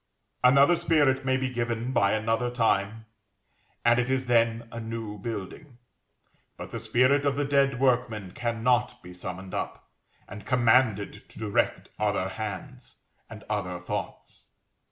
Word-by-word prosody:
Another 140 +6 +6
spirit 145 -5 +2
may 130 0 +2
be 130 0 -1
given 120 -1 -2
by 100 -6 +3
another 115 +3 0
time, 115 -2 0 0.8
and 120 +1 +5
it 125 +1 0
is 130 0 0
then 115 -1 +2
a 115 - -6
new 110 -2 -6
building; 115 - -7 0.8
but - - -8
the 115 - -4
spirit 125 +6 +3
of 140 -1 +1
the 145 0 0
dead 140 -2 +2
workman 120 -7 +1
cannot 120 +2 0
be 90 0 -10
summoned 95 +1 -7
up, - - -5 0.4
and 105 - -9
commanded 115 -3 +2
to - - -16
direct 105 -1 -1
other 105 -3 0
hands, 95 -1 -7 0.3
and - - -10
other 90 -3 -3
thoughts. 90 - -6
115 Hz, 140 wpm, -27 LUFS, 105-130 Hz, 0.8 s, Another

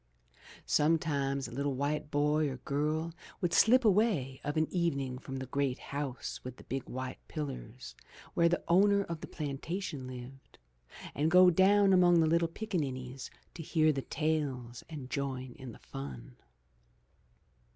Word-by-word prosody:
Some 155 +2 +3
times 140 -5 -1
a - - -10
little 140 +2 -1
white 145 +2 -1
boy 150 +1 +2
or 130 - -5
girl 155 +5 -1 0.3
would 175 -2 -1
slip 250 +2 +5
away 190 - +2
of 145 +2 -2
an 155 - +3
evening 140 -8 -1
from 135 0 -6
the 130 - -4
great 135 0 -1
house 140 -2 -5
with 125 0 -7
the - - -13
big 135 0 -5
white 130 0 -5
pillars 130 -5 -6 0.4
where 170 0 +4
the 175 - 0
owner 200 +4 +5
of 170 -4 -6
the - - -6
plantation 150 0 -4
lived, 130 +1 -10 0.6
and 150 +3 +1
go 180 +1 +7
down 195 +2 +5
among 175 -2 +6
the 160 - +4
little 165 +1 +3
pickanin 165 -7 -2
nies 130 +1 -7 0.2
to 170 - -7
hear 155 -1 +2
the 135 - -2
tales 135 -7 -2
and 140 -6 -8
join 130 -2 -3
in 130 -2 -7
the - - -12
fun. 65 -3 -8
145 Hz, 160 wpm, -32 LUFS, 130-170 Hz, 0.6 s, go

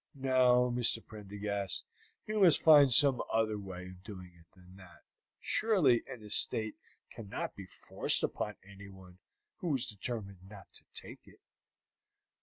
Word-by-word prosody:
No, 125 -2 +3
Mr. 115 -2 0
Prendergast, 100 -2 -5 0.4
you 215 0 -2
must 180 -6 +5
find 145 -4 +7
some 135 0 +6
other 110 -2 0
way 95 -2 -8
of 90 0 -12
doing 95 -4 -10
it 85 -1 -22
than 90 0 -18
that. 90 -3 -16 0.4
Surely 175 - +2
an 115 -4 -9
estate 110 +1 0 0.4
cannot 110 -4 -6
be 95 -2 -10
forced - - 0
upon 105 -1 -3
anyone 95 -2 -14 0.4
who 165 -5 -1
is 125 -2 -1
determined 100 -3 -6
not 100 -3 -12
to - - -12
take - - -10
it." - - -19
105 Hz, 140 wpm, -32 LUFS, 95-125 Hz, 0.4 s, find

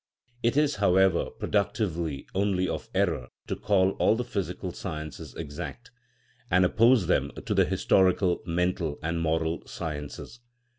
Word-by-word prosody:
It 120 +4 +1
is, 150 -1 +2
however, 95 -2 +3
productive 100 -2 -1 0.4
only 95 -1 +1
of 115 - -4
error 85 -10 +1 0.2
to - - -3
call 95 -2 +2
all - - +4
the 125 - -1
physical 100 -6 -4
sciences 75 -1 -7
exact, 75 -3 -7 0.6
and 90 +1 +4
oppose 115 +2 +4
them - - +1 0.2
to - - 0
the - - +4
historical, 95 -1 +2
mental, 85 -3 0
and 85 +1 -1
moral 80 0 0
sciences. 75 +8 -6
90 Hz, 135 wpm, -27 LUFS, 80-100 Hz, 0.6 s, all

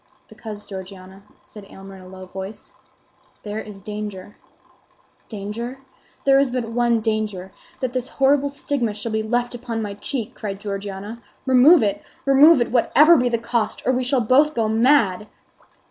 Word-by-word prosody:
"Because, 210 -2 -9
Georgiana," 190 -1 -10 0.2
said 210 - -12
Aylmer, 195 0 -12
in - - -13
a 185 - -13
low 185 0 -10
voice, 190 +3 -9 0.7
"there 210 0 -5
is 205 -3 -10
danger." 210 -2 -7 0.9
"Danger? 225 +4 -6 0.5
There 275 0 +5
is 275 -1 +2
but 250 0 -2
one 235 -1 +1
danger—that 215 +2 -4
this 255 -1 -2
horrible 280 +1 +2
stigma 275 -6 -2
shall 215 +2 -5
be 220 0 0
left 240 +3 -1
upon 235 -1 -5
my 205 -1 -5
cheek!" 225 +3 -5
cried 195 -2 -6
Georgiana. 200 +2 -6 0.2
"Remove 260 +4 +6
it, 200 -2 -1 0.2
remove 280 +3 +6
it, 240 - -1
whatever 300 +7 +5
be 250 -4 +2
the 235 - 0
cost, 230 -1 -2
or 260 - +2
we 255 0 0
shall 255 0 +1
both 280 +7 +3
go 225 -2 +1
mad!" 220 -3 +2
225 Hz, 160 wpm, -21 LUFS, 205-255 Hz, 0.9 s, Remove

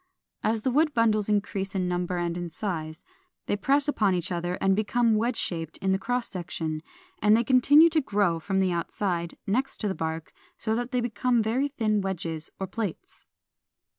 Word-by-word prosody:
As 220 0 0
the 260 - +1
wood 300 +2 +2
bundles 215 -3 +2
increase 200 -2 -1
in 185 -1 0
number 180 0 -1
and 170 -1 -1
in 175 -1 -4
size, 160 -4 -4 0.4
they - - 0
press 275 +8 +2
upon 210 -10 +2
each 175 -1 -2
other 175 0 -2
and 195 +1 +2
become 225 +2 +2
wedge 230 +3 +1
shaped 165 -3 -2
in 190 - 0
the 190 - +2
cross 245 +3 -1
section; 160 -3 -4 0.4
and 210 +1 +5
they 235 - +2
continue 275 +6 +6
to 315 -1 +3
grow 200 - +1
from 190 +4 -1
the 185 -1 +2
outside, 170 0 -2
next 255 +7 -1
the 205 -2 0
bark, 160 -2 -4 0.2
so 220 -1 -1
that 245 +1 -2
they 250 -2 +1
become 240 0 +1
very 245 +6 +1
thin 220 -7 0
wedges 165 -4 -4
or 190 - -1
plates. 200 -2 -6
205 Hz, 185 wpm, -27 LUFS, 175-235 Hz, 0.4 s, continue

